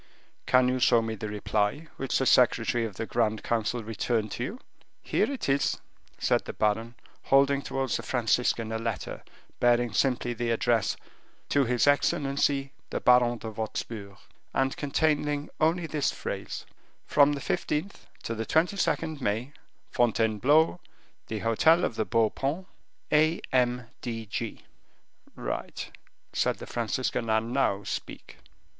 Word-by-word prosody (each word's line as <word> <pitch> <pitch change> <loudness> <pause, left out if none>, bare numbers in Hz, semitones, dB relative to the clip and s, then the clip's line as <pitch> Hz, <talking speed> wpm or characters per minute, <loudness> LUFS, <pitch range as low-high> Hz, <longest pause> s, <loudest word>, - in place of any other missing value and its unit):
"Can 125 0 +5
you 130 0 +1
show 120 -1 +5
me 110 0 -3
the 110 0 -5
reply 105 +8 -1
which 135 -1 0
the 135 - +1
secretary 120 -2 +3
of 105 -4 -6
the 110 - -3
grand 110 -2 0
council 115 0 -1
returned 110 0 -1
to 120 - -3
you?" 210 - -5 0.4
"Here - - 0
it 275 - -4
is," 140 +1 +1 0.4
said - - +1
the - - -5
baron, 110 +2 0 0.3
holding 140 0 +4
towards 135 -2 -1
the - - -5
Franciscan 115 -2 0
a 110 - -2
letter 115 -7 -4 0.4
bearing 120 -2 +3
simply 120 0 +1
the 120 0 -2
address, 115 -1 +1 0.5
"To 140 -1 +3
his 125 0 +2
excellency 140 -1 +2 0.2
the - - -2
Baron 125 -1 +4
de 110 0 -6
Wostpur," 105 -2 -5 0.4
and 135 0 +1
containing 150 0 0
only 165 +2 +2
this 150 -3 0
phrase, - - -5 0.4
"From 145 0 +4
the 145 - -3
15th 150 +7 -3 0.2
to 115 - -3
the 110 0 -3
22nd 160 -3 +1
May, 115 +6 -1 0.4
Fontainebleau, 120 - +3 0.5
the 110 - -3
hotel 135 - +4
of - - -2
the 110 - -1
Beau 115 -2 +2
Paon. 150 +8 -2 0.5
A. 155 +2 +4
M. 125 -1 +2 0.2
D. 115 -2 -4
G." 110 +1 -5 0.7
"Right," - - -5 0.4
said - - +1
the - - -8
Franciscan, 115 - -2
"and 110 +2 +1
now 100 -7 +1
speak." - - -6
120 Hz, 145 wpm, -28 LUFS, 115-140 Hz, 0.7 s, Can